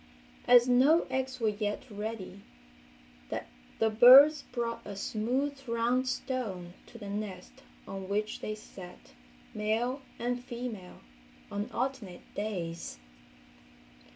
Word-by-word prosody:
As 245 0 +7
no 270 +7 +5
eggs 260 -1 -2
were 225 -2 +2
yet 210 0 -3
ready 210 -2 -6 1.4
the 220 0 +2
birds 260 +7 +9
brought 235 -2 -3
a 205 - -7
smooth 250 +8 -1
round 235 +3 +1
stone 220 -9 -3
to 235 - -12
the 205 -3 -8
nest 200 - -6 0.3
on 195 -1 -6
which 210 +1 -1
they 215 - -4
sat, 180 - -13 0.4
male 230 +6 -1 0.2
and 245 +1 -2
female, 235 -7 -7 0.5
on 205 +1 -3
alternate 240 -8 -4
days. 175 - -4
225 Hz, 110 wpm, -30 LUFS, 205-250 Hz, 1.4 s, birds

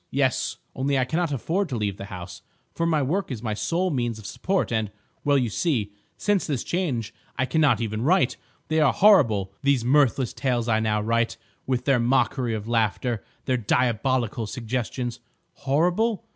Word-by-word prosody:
"Yes. 130 -1 0 0.2
Only 135 +1 0
I 130 - +2
cannot 165 +3 -1
afford 170 - -1
to 130 - -3
leave 100 -3 -2
the 100 - -7
house, 90 -2 -8 0.3
for 170 - 0
my 155 -3 +2
work 185 +9 -1
is 120 -4 -5
my 110 -2 -1
sole 175 - 0
means 120 -5 -1
of 110 - -11
support, 190 - -1
and—well, 110 +6 -1
you 125 -4 0
see, 110 - 0 0.2
since 205 -3 +1
this 140 -6 -1
change 140 - -2 0.2
I 130 - +2
cannot 145 -6 +2
even 110 -1 -2
write. 180 +9 +3 0.3
They 160 0 +2
are 150 -3 +4
horrible, 115 - +4
these 140 -4 +2
mirthless 135 -2 +3
tales 120 -3 -1
I 110 -1 +3
now 105 -1 +1
write, 115 +1 0 0.3
with 125 -1 -1
their 135 -3 +3
mockery 125 0 +1
of 105 0 -6
laughter, 115 0 0 0.2
their 130 -1 +1
diabolical 120 0 0
suggestion. 120 +2 -3 0.4
Horrible? 180 +10 +1
130 Hz, 170 wpm, -25 LUFS, 115-150 Hz, 0.4 s, are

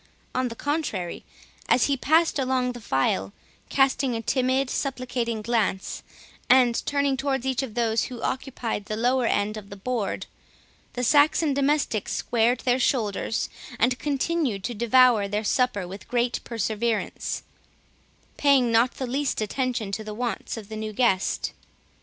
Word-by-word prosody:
On 255 0 0
the 230 - -6
contrary, 260 - -2 0.5
as 250 - +5
he 280 - +2
passed 315 +3 +2
along 255 -1 +1
the 245 -1 -9
file, 100 - 0 0.4
casting 270 -2 +2
a 225 - -2
timid 260 +1 +1
supplicating 245 -4 -2
glance, 215 -4 -1 0.5
and 245 -2 +5
turning 280 -1 +1
towards 265 -1 -1
each 260 -1 0
of 255 -6 -6
those 230 -2 +1
who 250 -2 -7
occupied 245 -5 -3
the 215 +1 -4
lower 245 +1 +2
end 210 +1 0
of 200 -2 -9
the 200 - -8
board, 215 0 -2 0.7
the 250 - -3
Saxon 290 +3 +4
domestics 280 -6 0
squared 240 +1 +1
their 250 0 +2
shoulders, 225 -3 0 0.3
and 250 +3 +2
continued 280 - -1
to 240 - -2
devour 235 -1 +4
their 205 +2 -2
supper 215 -5 +1
with 195 +3 -9
great 240 0 0
perseverance, 225 0 -2 0.9
paying 275 -4 +4
not 230 +3 +3
the 260 - -3
least 270 +3 -1
attention 230 -1 -2
to 215 +2 -3
the 215 0 -6
wants 240 0 -3
of 215 -3 -8
the 220 - -7
new 215 0 -4
guest. 200 -5 +1
245 Hz, 150 wpm, -25 LUFS, 215-265 Hz, 0.9 s, as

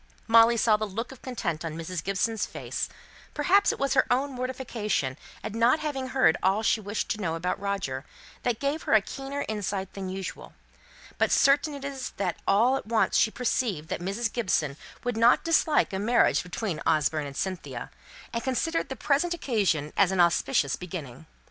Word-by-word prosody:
Molly 230 +1 +6
saw 215 -1 +4
the 215 - -2
look 225 +6 -5
of 265 - -13
content 175 -11 -3
on 160 -1 -4
Mrs. 165 +1 -4
Gibson's 200 +3 0
face; - - -4 0.5
perhaps 360 +7 +4
it - - -5
was 275 -1 0
her 260 - +3
own 270 +3 +1
mortification 245 - -2 0.3
at 215 0 -5
not 230 +5 +4
having 285 -4 -3
heard 255 -11 +3
all 195 +4 +2
she 220 - +2
wished 205 +1 -3
to 215 - -2
know 165 -4 -1
about 180 +2 -2
Roger, 195 -10 -3 0.4
which 245 -2 0
gave 280 +5 -1
her - - -1
a 215 - +6
keener 275 +6 -5
insight 200 -3 -3
than 190 -1 -5
usual, 190 0 -6 0.7
but - - +3
certain 285 +2 +4
it 280 -1 -7
is 275 -2 -5
that 185 -3 -1
all 240 +7 +4
at - - -8
once 225 -1 +2
she - - +4
perceived 220 - -1
that - - -3
Mrs. 205 +6 -2
Gibson 170 - 0 0.3
would 245 -2 -2
not 230 +2 +5
dislike 315 - +2
a 190 - -1
marriage 235 +4 +3
between 180 0 -4
Osborne 155 -1 +1
and 140 0 -9
Cynthia, 185 -2 -4 0.4
and 230 - -2
considered 325 +6 -1
the 265 - -4
present 315 +6 +1
occasion 200 - 0
as 195 -2 +4
an 190 - -1
auspicious 150 -5 +3
beginning. 160 -6 -8
220 Hz, 185 wpm, -27 LUFS, 180-260 Hz, 0.7 s, Molly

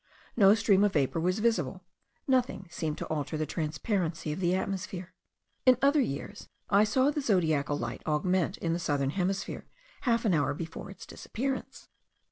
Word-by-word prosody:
No 205 -2 +7
stream 205 -2 +3
of 205 - +2
vapour 145 +3 +1
was 180 +2 +1
visible: 230 +1 0 0.4
nothing 250 -7 +1
seemed 160 -2 -3
to - - -4
alter 155 0 -3
the 155 - -1
transparency 160 +1 -2
of 150 - -4
the 180 0 +2
atmosphere. 190 -1 -4 0.5
In 255 -2 +6
other 280 +2 +4
years 200 - -5 0.2
I 205 +1 +6
saw 260 +6 +3
the 295 - -2
zodiacal 160 - +1
light - - -4
augment 180 +4 +1
in 165 -1 -1
the 170 - -1
southern 140 -4 0
hemisphere 195 +3 -2 0.3
half 235 -2 +1
an 205 - +3
hour 145 -2 +1
before 165 +4 -7
its 195 - -10
disappearance. 265 +3 -5
185 Hz, 165 wpm, -29 LUFS, 155-215 Hz, 0.5 s, No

